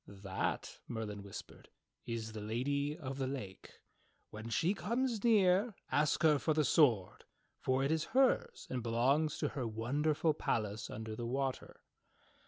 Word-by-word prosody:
"That," 95 -1 -3
Merlin 105 -3 -4
whispered, 100 0 -10 0.4
"is 115 -1 -3
the 110 -1 -6
Lady 140 +7 -1
of 135 -4 -6
the 135 - 0
Lake. 105 -9 -7 0.5
When 110 +2 -7
she 165 - +2
comes 235 +1 -1
near 205 -1 +4 0.2
ask 150 +2 +2
her 150 -3 +5
for 155 +1 +1
the 155 -1 +3
sword, 120 - +3 0.3
for 130 +1 +1
it 140 - +1
is 160 0 +1
hers 455 - +3
and 125 - -1
belongs 130 +7 +2
to - - 0
her 130 -5 -3
wonderful 145 +8 +1
palace 105 -5 -2
under 110 0 -5
the 115 +1 -4
water." 135 +1 -3
135 Hz, 150 wpm, -35 LUFS, 110-155 Hz, 0.5 s, her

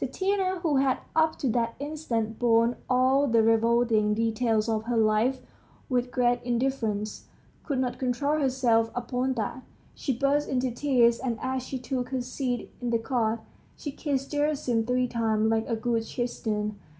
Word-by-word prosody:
Tatiana, 375 +6 0
who 310 -5 +1
had 265 -1 +2 0.2
up 320 0 +3
to 275 - -2
that 230 0 0
instant 245 -7 -3
borne 235 0 +3
all 260 +3 +3
the 230 -2 +4
revolting 225 -1 +3
details 225 0 +1
of 220 -1 -1
her 240 0 0
life 225 +4 +2 0.5
with 250 -1 0
great 245 0 +1
indifference, 235 -4 -2 0.4
could 280 -4 -2
not 255 -1 -1
control 280 +4 0
herself 250 -5 +2
upon 250 +2 -1
that; 235 +2 -3 0.3
she 275 - -2
burst 280 +3 +1
into 255 -1 0
tears, 240 -2 +3
and 240 -3 -2
as 260 0 -2
she 260 +1 -5
took 250 -1 -3
her 260 -1 -1
seat 250 0 -3
in 245 - -2
the 235 - +2
cart, 230 -1 -1 0.4
she 290 - -5
kissed 275 -1 -3
Gerasim 290 -6 0
three 250 0 +1
times 220 -2 +1
like 225 0 0
a 230 - +1
good 225 0 -1
Christian. 210 -4 -2
245 Hz, 160 wpm, -27 LUFS, 225-265 Hz, 0.5 s, the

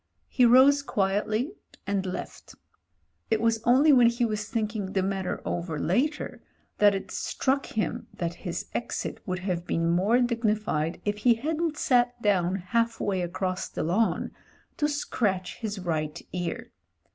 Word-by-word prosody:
He 250 -2 +4
rose 265 +4 +6
quietly, 215 - 0 0.3
and 200 -1 -1
left. 185 - -7 0.7
It 220 - +2
was 230 0 +2
c«ily 260 +7 +5
when 245 -3 +7
he 235 +1 +1
was 215 -1 -3
thinking 215 -4 -2
the 190 - +1
matter 190 -1 -2
over 170 -2 -3
later 245 - -1 0.4
that 205 -1 +6
it 195 - -5
struck 275 +1 -1
him 230 +2 -2
that 170 -1 -2
his 175 -3 -4
exit 240 - -3
would 185 -1 -1
have 175 -3 -2
been 165 0 +1
more 200 +8 +3
dignified 215 -9 0
if 205 0 0
he 235 +2 +4
hadn't 310 +5 -2
sat 245 -1 +2
down 190 -4 +2
halfway 205 0 0
across 185 +2 -2
the - - -3
lawn 200 +8 +1 0.5
to 295 - +2
scratch 200 -10 -1
his 215 -3 -4
right 160 -3 -2
ear. 175 -2 -4
210 Hz, 145 wpm, -27 LUFS, 185-240 Hz, 0.7 s, when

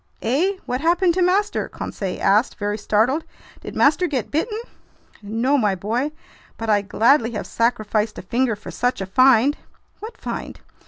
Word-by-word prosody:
"Eh? 295 - +1
What 250 +2 -2
happened 345 +2 +3
to 370 - 0
master?" 385 +4 +1
Conseil 190 -3 -5
asked, 210 +6 +3
very 205 -1 -2
startled. 225 +9 +1 0.4
"Did - - -9
master 305 +5 +3
get 265 -8 -3
bitten?" 425 +9 -1 0.6
"No, 230 +7 +1
my 205 -4 +1
boy, 235 +10 -2 0.5
but 225 -1 -1
I'd 205 -1 +1
gladly 235 +1 +3
have 210 - -4
sacrificed 215 -2 0
a - - -7
finger 235 +3 0
for 205 - -10
such 245 +1 -1
a 195 - -3
find!" 255 +6 +4 0.4
"What 445 +2 -9
find?" - - -6
245 Hz, 160 wpm, -21 LUFS, 215-300 Hz, 0.6 s, find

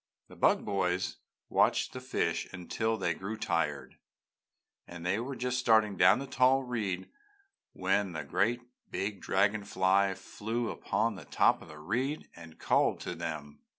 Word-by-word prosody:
The - - -13
Bug - - +3
Boys 95 -2 0 0.3
watched - - +2
the 130 - -6
fish 85 -10 -1
until 110 +5 -2
they - - 0
grew 105 +3 -5
tired, 75 -9 -2 0.9
and 85 0 -9
they 95 +4 +1
were 130 +3 -4
just 125 0 -1
starting 110 -4 +4
down - - +6
the 135 - -4
tall 130 +1 +3
reed 105 -7 -3 0.7
when 95 -1 0
a 80 - -3
great 115 +6 +1 0.3
big 100 0 -3
dragon 100 +2 +2
fly 95 0 +2
flew 115 +5 -3
upon 115 +1 0
the 90 -7 -10
top - - +3
of - - -12
the 75 - -11
reed 125 - -2
and 80 -1 -12
called - - +2
to - - -4
them. 75 -2 -6
100 Hz, 155 wpm, -31 LUFS, 90-115 Hz, 0.9 s, down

